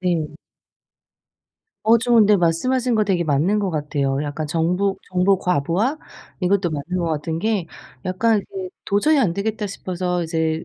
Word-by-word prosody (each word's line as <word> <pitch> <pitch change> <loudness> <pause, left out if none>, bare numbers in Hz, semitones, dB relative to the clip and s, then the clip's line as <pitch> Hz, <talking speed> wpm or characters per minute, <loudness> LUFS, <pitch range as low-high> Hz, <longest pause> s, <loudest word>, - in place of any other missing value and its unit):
네. 165 -5 -1 1.5
어 225 +2 +6
좀 240 0 +2
근데 210 -2 +6
말씀하신 235 +9 +1
거 215 -1 +3
되게 190 -4 +1
맞는 160 +8 +2
것 200 -2 -1
같아요. 145 -3 -1
약간 150 +1 -4
정보 180 +5 0
정보 185 +1 +3
과부하 180 - 0 0.4
이것도 185 -1 +1
맞는 155 +4 -3
것 175 - -1
같은 160 +1 -2
게 205 -2 0 0.4
약간 205 +3 +1
그 190 -1 -5 0.2
'도저히 285 +10 +2
안 215 -11 +2
되겠다.' 210 +3 -2
싶어서 180 -2 -3
이제 160 -1 -1
180 Hz, 290 characters per minute, -21 LUFS, 160-210 Hz, 1.5 s, 어